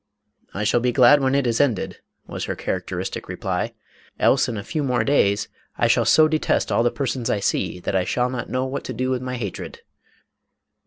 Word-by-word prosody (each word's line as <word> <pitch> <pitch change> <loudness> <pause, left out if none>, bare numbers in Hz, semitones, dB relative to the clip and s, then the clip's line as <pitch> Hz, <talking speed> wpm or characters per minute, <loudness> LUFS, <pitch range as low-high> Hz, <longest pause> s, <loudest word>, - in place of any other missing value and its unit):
" - - -53
I 105 - -2
shall 115 +3 +2
be 125 +1 +1
glad 130 +3 +6
when 135 0 +2
it 140 -2 +2
is 115 +1 +2
ended," 125 -9 -1 0.3
was - - -5
her - - -3
characteristic - - -4
reply, - - -3 0.2
" - - -30
else, - - +3
in 115 - -4
a 100 - -5
few 155 +6 -3
more 125 -3 +1
days, 100 -8 +2 0.3
I - - +2
shall - - +3
so 155 0 +6
detest 155 0 0
all - - +3
the 120 - +3
persons 130 -2 -3
I 105 - +1
see 95 - -1
that 95 - -2
I 95 - +2
shall 125 +6 0
not 120 -2 -5
know 130 +3 -1
what 135 +1 -4
to 130 - -4
do 130 +3 -1
with 125 -1 -1
my 125 0 -4
hatred." 100 -6 -6
125 Hz, 220 wpm, -22 LUFS, 115-135 Hz, 0.3 s, glad